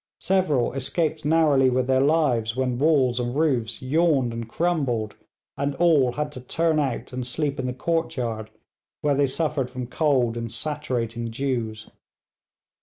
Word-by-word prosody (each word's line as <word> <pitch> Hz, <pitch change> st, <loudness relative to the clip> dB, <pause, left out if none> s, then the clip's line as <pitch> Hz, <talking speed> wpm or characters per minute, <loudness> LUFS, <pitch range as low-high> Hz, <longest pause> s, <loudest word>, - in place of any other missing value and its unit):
Several 155 Hz, -12 st, +1 dB
escaped 155 Hz, +3 st, -1 dB
narrowly 150 Hz, -4 st, +4 dB
with 125 Hz, 0 st, +1 dB
their 130 Hz, 0 st, +2 dB
lives 135 Hz, -7 st, +2 dB
when 125 Hz, -2 st, -1 dB
walls 135 Hz, -5 st, +3 dB
and 120 Hz, +1 st, -2 dB
roofs 130 Hz, -7 st, 0 dB
yawned 140 Hz, -3 st, +2 dB
and 115 Hz, -1 st, -6 dB
crumbled, 130 Hz, -8 st, -1 dB, 0.4 s
and 140 Hz, 0 st, -1 dB
all 145 Hz, -7 st, +3 dB
had 150 Hz, +1 st, -3 dB
to 130 Hz, -, -8 dB
turn 160 Hz, +5 st, +1 dB
out 130 Hz, -3 st, -2 dB
and 125 Hz, 0 st, -3 dB
sleep 140 Hz, +3 st, -2 dB
in 130 Hz, -, -2 dB
the -, -, -1 dB
courtyard, 125 Hz, -9 st, -2 dB, 0.5 s
where 145 Hz, -1 st, +2 dB
they 140 Hz, 0 st, +2 dB
suffered 145 Hz, -2 st, -1 dB
from 125 Hz, -1 st, -5 dB
cold 125 Hz, -4 st, +1 dB
and 115 Hz, -1 st, -4 dB
saturating 120 Hz, -7 st, -3 dB
dews. 115 Hz, -3 st, -3 dB
130 Hz, 150 wpm, -24 LUFS, 120-150 Hz, 0.5 s, narrowly